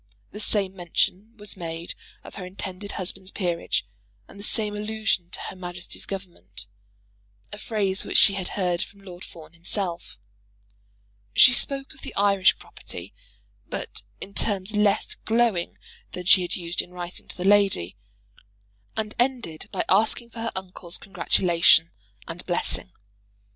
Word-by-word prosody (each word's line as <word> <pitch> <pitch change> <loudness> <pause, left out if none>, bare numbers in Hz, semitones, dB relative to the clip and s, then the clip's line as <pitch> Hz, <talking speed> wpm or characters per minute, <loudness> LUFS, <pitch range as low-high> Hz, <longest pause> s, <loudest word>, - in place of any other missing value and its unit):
The 210 - -7
same 200 -3 +1
mention 195 +5 0
was 210 -1 -2
made 165 -2 -5 0.3
of - - -10
her 195 - -7
intended 190 +2 -5
husband's 185 0 -1
peerage, 175 -4 -1 0.4
and 200 - -13
the - - -7
same 210 -1 0
allusion 210 -4 -1
to - - -6
Her - - -5
Majesty's 180 -1 -6
Government, 105 - -6 0.9
a 205 - -6
phrase 200 -4 0
which - - +2
she 200 - +8
had 190 -2 -2
heard 180 -2 +1
from 200 -1 -6
Lord 180 -2 -10
Fawn 160 -1 -12
himself. 170 - -2 1.2
She 255 - +9
spoke 275 +3 +1
of 310 - -17
the - - -7
Irish 200 -1 +4
property, - - -7 0.6
but - - -4 0.2
in 200 - -7
terms 200 -1 -1
less 210 -1 +3
glowing 225 -6 +1 0.4
than 180 - -5
she 190 +1 +8
had 175 - -1
used 170 -1 -2
in - - -11
writing 180 0 -8
to - - -7
the 180 - -3
lady, 195 - +4 1.0
and 215 -1 -1
ended 240 -11 0
by - - -1
asking 225 +4 +3
for 230 - -8
her 230 0 -1
uncle's 185 -2 -3
congratulation 170 -3 +4 0.4
and 170 +1 -6
blessing. 175 - -1
190 Hz, 150 wpm, -26 LUFS, 175-210 Hz, 1.2 s, She